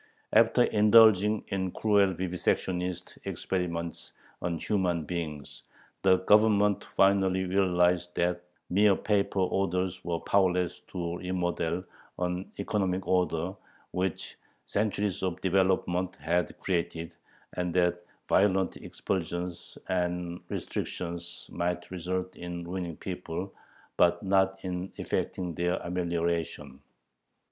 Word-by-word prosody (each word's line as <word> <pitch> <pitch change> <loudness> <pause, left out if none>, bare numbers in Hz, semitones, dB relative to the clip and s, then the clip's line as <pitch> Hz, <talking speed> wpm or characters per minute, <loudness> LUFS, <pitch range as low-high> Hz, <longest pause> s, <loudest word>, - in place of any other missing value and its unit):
After - - +5
indulging 105 -1 +5
in 95 -2 -1
cruel 100 -3 +3
vivisectionist 90 0 -2
experiments 85 -3 -3 0.3
on 85 -1 -1
human 90 -4 0
beings, 75 -5 -5 0.4
the 95 -1 +5
Government 105 -1 +4
finally 95 -1 +3
realized 90 -2 +2
that 90 0 0 0.3
mere 100 +1 +5
paper 100 -1 +1
orders 95 -1 0
were 85 -1 -2
powerless 90 -2 +1
to 85 -2 -3
remodel 90 -1 -1 0.3
an 90 +1 -2
economic 95 -2 -1
order, 90 -1 +1 0.4
which 90 -1 -3 0.3
centuries 100 -2 -1
of 95 -2 -2
development 95 -1 +1
had 85 +4 -1
created, 85 -2 -2 0.4
and 90 -1 -2
that 90 -1 +2 0.3
violent 95 -1 +3
expulsions 90 -1 -4
and 90 -1 -1
restrictions 85 0 -5
might 85 0 -2
result 90 +1 -3
in 85 0 -6
ruining 90 -3 -4
people, 90 0 -5 0.4
but 85 +1 +4
not 95 0 +3
in 90 0 -4
effecting 90 -2 -2
their 90 +2 0
"amelioration." 85 -5 -2
90 Hz, 100 wpm, -29 LUFS, 85-95 Hz, 0.4 s, After